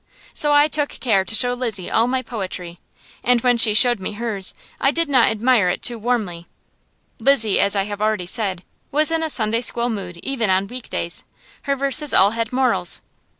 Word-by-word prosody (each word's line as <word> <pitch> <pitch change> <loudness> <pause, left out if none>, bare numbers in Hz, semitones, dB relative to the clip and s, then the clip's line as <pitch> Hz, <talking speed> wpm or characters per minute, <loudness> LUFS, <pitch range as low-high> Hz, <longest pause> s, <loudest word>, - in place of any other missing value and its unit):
So 295 -2 0
I 290 +1 +5
took 295 -1 0
care 205 -7 0
to 225 - -4
show 245 +2 +4
Lizzie 230 -7 -4
all 230 - +2
my 255 +1 -1
poetry, 185 -7 -7 0.4
and 245 0 +3
when 245 -1 +2
she 220 -2 +5
showed 240 0 +4
me 190 +3 -5
hers 205 -3 -1 0.2
I 270 - +2
did 330 +3 +1
not 260 -5 +3
admire 220 -3 +1
it - - -4
too 235 -2 0
warmly. 205 -8 -3 0.7
Lizzie, 225 -4 +3
as 200 +1 +2
I 195 - +1
have 205 0 -7
already 215 -4 -1
said, 190 -2 +1 0.3
was 305 +3 +3
in 325 0 0
a 320 - -2
Sunday 230 -3 0
school 240 0 -1
mood 180 -5 -7
even 245 -6 -2
on 190 +1 +1
week 245 +3 -9
days; 170 +1 -4 0.5
her 280 - +2
verses 275 +2 +3
all 195 +2 +5
had 230 0 -3
morals. 255 0 0
230 Hz, 195 wpm, -20 LUFS, 200-255 Hz, 0.7 s, I